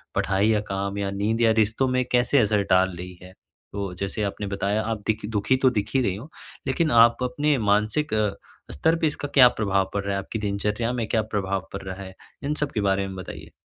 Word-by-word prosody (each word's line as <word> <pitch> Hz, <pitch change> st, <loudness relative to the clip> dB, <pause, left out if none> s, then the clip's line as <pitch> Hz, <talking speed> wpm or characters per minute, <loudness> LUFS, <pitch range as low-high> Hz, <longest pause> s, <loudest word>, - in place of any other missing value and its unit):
पढ़ाई 100 Hz, +1 st, +1 dB
या 110 Hz, -1 st, +3 dB
काम 100 Hz, +1 st, -2 dB
या 100 Hz, -1 st, -1 dB
नींद 105 Hz, +4 st, -1 dB
या 115 Hz, -1 st, +5 dB
रिश्तों 110 Hz, +5 st, +2 dB
में 130 Hz, 0 st, +1 dB
कैसे 125 Hz, +3 st, +3 dB
असर 105 Hz, -3 st, +2 dB
डाल 95 Hz, 0 st, +3 dB
रही 90 Hz, 0 st, -8 dB
है? 90 Hz, 0 st, -13 dB, 0.4 s
तो 100 Hz, -2 st, -4 dB
जैसे 100 Hz, +2 st, -2 dB
आपने 100 Hz, 0 st, -3 dB
बताया 100 Hz, +2 st, -1 dB
आप 110 Hz, -1 st, -3 dB
देखि 110 Hz, -1 st, -1 dB
दुःखी 105 Hz, +3 st, +1 dB
तो 130 Hz, 0 st, +4 dB
दिख 105 Hz, -4 st, -2 dB
ही 135 Hz, -, +4 dB
रही 95 Hz, -6 st, 0 dB
हो। 125 Hz, +10 st, -9 dB, 0.4 s
लेकिन 150 Hz, +4 st, +1 dB
आप 120 Hz, +2 st, +2 dB
अपने 145 Hz, +4 st, +1 dB
मानसिक 105 Hz, +6 st, +1 dB, 0.6 s
स्तर 160 Hz, -, +2 dB
पे 165 Hz, -, +2 dB
इसका 145 Hz, -1 st, -3 dB
क्या 130 Hz, -3 st, +9 dB
प्रभाव 95 Hz, -2 st, +1 dB
पड़ 100 Hz, -1 st, -1 dB
रहा 100 Hz, -, -2 dB
है? 100 Hz, -, -1 dB
आपकी 110 Hz, -, -5 dB
दिनचर्या 105 Hz, +3 st, -1 dB
में 115 Hz, -3 st, -2 dB
क्या 110 Hz, -, +1 dB
प्रभाव 95 Hz, -3 st, -1 dB
पड़ 100 Hz, -, -5 dB
रहा 95 Hz, 0 st, -6 dB
है? 95 Hz, 0 st, -9 dB, 0.3 s
इन 145 Hz, -, -1 dB
सब 145 Hz, -, -3 dB
के 105 Hz, -, -1 dB
बारे 95 Hz, 0 st, +1 dB
में 95 Hz, -, -7 dB
बताइए। 95 Hz, -, -9 dB
105 Hz, 225 wpm, -24 LUFS, 100-120 Hz, 0.6 s, क्या